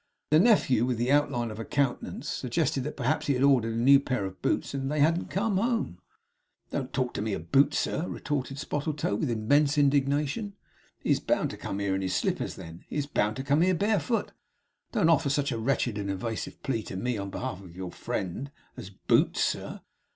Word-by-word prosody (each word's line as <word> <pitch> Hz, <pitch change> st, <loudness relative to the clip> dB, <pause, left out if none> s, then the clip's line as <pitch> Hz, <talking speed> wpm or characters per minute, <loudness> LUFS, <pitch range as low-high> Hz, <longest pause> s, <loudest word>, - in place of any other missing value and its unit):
The 155 Hz, -, +7 dB
nephew 165 Hz, -, +4 dB
with 125 Hz, -2 st, 0 dB
the 120 Hz, +3 st, 0 dB
outline 140 Hz, -6 st, +2 dB
of 105 Hz, -, -8 dB
a -, -, -3 dB
countenance, 140 Hz, +1 st, -1 dB
suggested 140 Hz, +1 st, -1 dB
that 150 Hz, -, -5 dB
perhaps 140 Hz, +4 st, 0 dB
he 140 Hz, -, +2 dB
had 125 Hz, -, +1 dB
ordered 120 Hz, -5 st, +3 dB
a -, -, -2 dB
new 135 Hz, +4 st, +6 dB
pair 125 Hz, -7 st, -2 dB
of 95 Hz, -1 st, -8 dB
boots, -, -, 0 dB
and 135 Hz, 0 st, -2 dB
they 150 Hz, -, -1 dB
hadn't 165 Hz, +4 st, +2 dB
come 200 Hz, +1 st, 0 dB
home. 225 Hz, -, -1 dB, 0.7 s
'Don't 135 Hz, -2 st, -3 dB
talk 130 Hz, -2 st, -1 dB
to -, -, -3 dB
me 105 Hz, -1 st, -1 dB
of 85 Hz, -2 st, -6 dB
Boots, 140 Hz, +2 st, +4 dB
sir!' 170 Hz, -, -1 dB
retorted 135 Hz, -2 st, -3 dB
Spottletoe, 150 Hz, -3 st, -2 dB
with 115 Hz, +7 st, -1 dB
immense 140 Hz, +7 st, +2 dB
indignation. 145 Hz, +7 st, +1 dB, 0.4 s
'He -, -, -2 dB
is -, -, +3 dB
bound -, -, 0 dB
to -, -, -8 dB
come 95 Hz, -, -4 dB
here 100 Hz, -1 st, 0 dB
in 95 Hz, -, -1 dB
his 95 Hz, -1 st, -1 dB
slippers -, -, -1 dB
then; 80 Hz, +1 st, -10 dB
he -, -, -7 dB
is 145 Hz, -2 st, 0 dB
bound 110 Hz, -7 st, 0 dB
to 130 Hz, -, -4 dB
come 145 Hz, +3 st, +2 dB
here 185 Hz, +1 st, +3 dB
barefoot. 210 Hz, +3 st, 0 dB, 0.6 s
Don't 210 Hz, -9 st, +2 dB
offer 160 Hz, -3 st, +3 dB
such 140 Hz, 0 st, +1 dB
a 115 Hz, -, -2 dB
wretched 120 Hz, -3 st, 0 dB
and 100 Hz, -1 st, -3 dB
evasive 105 Hz, +4 st, -4 dB
plea 120 Hz, -5 st, -1 dB
to 95 Hz, -, -7 dB
me 120 Hz, +2 st, -1 dB
on 100 Hz, 0 st, -4 dB
behalf 95 Hz, 0 st, -5 dB
of 90 Hz, -3 st, -13 dB
your 95 Hz, -1 st, -6 dB
friend, 95 Hz, +10 st, -4 dB, 0.3 s
as 95 Hz, -, -8 dB
Boots, 100 Hz, -, +2 dB
sir. -, -, -2 dB
135 Hz, 210 wpm, -28 LUFS, 110-150 Hz, 0.7 s, The